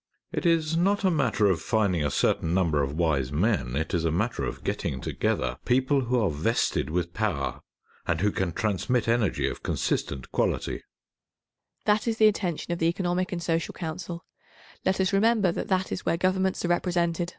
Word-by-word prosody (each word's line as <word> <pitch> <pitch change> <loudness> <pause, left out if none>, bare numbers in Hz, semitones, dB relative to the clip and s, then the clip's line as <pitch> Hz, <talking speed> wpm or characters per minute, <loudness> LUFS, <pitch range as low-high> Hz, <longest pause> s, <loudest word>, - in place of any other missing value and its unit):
It - - -1
is 165 -1 +2
not 200 +4 +2
a 190 - +4
matter 125 -9 +2
of 95 -5 +2
finding 100 -6 +1
a 75 - +1
certain 80 +4 +1
number 80 -6 +2
of 70 +1 -2
wise 75 -6 +1
men. 75 - 0
It 80 +3 -2
is 85 -3 +1
a 85 - +2
matter 110 +9 -1
of - - -4
getting 65 - -2
together 65 -1 -1
people 130 +2 +2
who 125 +1 +1
are 105 -7 +1
vested 80 +9 0
with 85 +1 -2
power, 90 -11 -1 0.5
and 85 - +1
who 105 +3 +2
can 95 -3 -1
transmit 110 +4 0
energy 115 -3 +1
of - - -5
consistent 65 -2 -2
quality. - - -1
95 Hz, 115 wpm, -27 LUFS, 80-120 Hz, 0.5 s, a